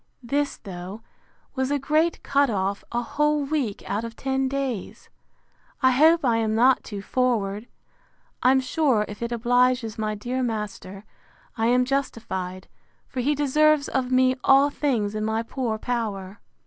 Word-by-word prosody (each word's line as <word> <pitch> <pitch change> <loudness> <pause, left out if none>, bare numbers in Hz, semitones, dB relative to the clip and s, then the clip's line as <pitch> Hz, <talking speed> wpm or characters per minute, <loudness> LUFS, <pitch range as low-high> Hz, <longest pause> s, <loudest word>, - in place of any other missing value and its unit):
This, 285 +4 -1
though, 190 +3 -8 0.5
was 260 0 -1
a 290 - +1
great 310 +4 +1
cut 280 -1 +2
off; 200 -1 -1
a 240 0 -1
whole 300 +4 +1
week 275 -8 -2
out 205 +3 -2
of 230 0 -7
ten 265 +1 -1
days. 265 -6 -4 0.7
I 260 - +6
hope 315 +4 +4
I 235 -2 +3
am 220 -1 0
not 250 +3 +4
too 200 -2 -7
forward! 220 -4 -1 0.7
I'm 265 +1 +4
sure, 260 -5 +1
if 210 - -9
it 235 0 -3
obliges 245 -1 +1
my 215 -1 -1
dear 245 +5 -3
master, 210 -4 -4 0.5
I 225 0 0
am 250 +1 +3
justified; 205 -9 -3 0.4
for 260 - -6
he 285 +4 +1
deserves 295 +1 +3
of 255 -1 -1
me 255 0 +4
all 275 +1 +5
things 235 -9 -1
in 215 0 -3
my 220 +1 -1
poor 230 -2 -3
power. 210 -5 -4
245 Hz, 155 wpm, -24 LUFS, 215-270 Hz, 0.7 s, I